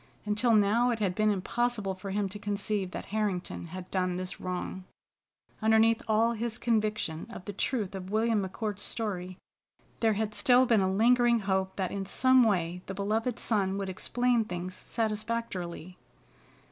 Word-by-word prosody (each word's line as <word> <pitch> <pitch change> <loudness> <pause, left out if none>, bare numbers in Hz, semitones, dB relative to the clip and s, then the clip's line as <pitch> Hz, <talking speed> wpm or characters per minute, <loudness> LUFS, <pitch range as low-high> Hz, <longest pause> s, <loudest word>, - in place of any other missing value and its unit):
Until 215 +3 +3
now 215 +4 +4
it 235 - 0
had 200 -4 0
been 215 +3 +2
impossible 210 +1 -1
for 190 +1 -8
him 200 +1 0
to 205 +2 -7
conceive 205 -1 -1
that - - -6
Harrington 200 -5 -2
had 185 +2 -8
done 185 -1 0
this 185 0 -5
wrong. 185 +1 -4 0.8
Underneath 220 +1 +4
all 225 +1 +3
his 235 0 -3
conviction 215 -9 -1
of 205 -5 -9
the 205 - -5
truth 210 -1 -1
of 190 -1 -6
William 220 0 +2
McCord's 205 +1 -4
story, 185 -5 -3 0.6
there 225 -2 +3
had 210 0 -2
still 250 +3 +5
been 230 -4 +3
a 190 0 +1
lingering 235 +3 +4
hope 190 -1 -1
that 190 -2 -2
in 195 -1 -4
some 260 +5 +5
way 180 -6 +1
the 195 - -5
beloved 220 +4 -1
son 195 -3 0
would 195 -1 -3
explain 240 +5 +1
things 180 -2 -5
satisfactorily. 215 -6 -3
210 Hz, 160 wpm, -29 LUFS, 190-225 Hz, 0.8 s, still